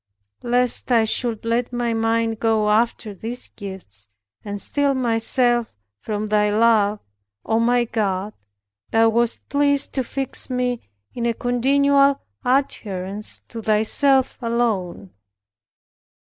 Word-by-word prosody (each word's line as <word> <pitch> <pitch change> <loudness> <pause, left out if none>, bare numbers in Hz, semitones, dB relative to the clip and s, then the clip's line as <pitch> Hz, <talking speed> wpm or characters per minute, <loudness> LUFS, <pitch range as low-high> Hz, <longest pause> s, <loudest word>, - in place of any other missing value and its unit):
Lest 245 +1 +1
I 230 -2 +4
should 225 0 -1
let 235 +2 -1
my 240 -1 -1
mind 225 0 0
go 220 -2 +1
after 220 -1 0
these 230 +6 -7
gifts, 185 - -10 0.4
and 205 0 -5
steal 285 +4 0
myself 240 0 +2 0.2
from 210 - -4
thy 210 0 +2
love, 215 -1 +2 0.4
O 225 0 +1
my 240 +1 +2
God, 210 -3 -2 0.6
Thou 225 0 +4
wast 235 +1 -1
pleased 285 -1 +1
to 265 - -1
fix 270 +2 -2
me 250 -1 -1 0.3
in 235 -1 -2
a 230 - 0
continual 275 +3 +2 0.2
adherence 210 -7 -1
to 230 - -7
Thyself 255 +6 +2
alone. 220 -6 -2
230 Hz, 120 wpm, -21 LUFS, 215-245 Hz, 0.6 s, I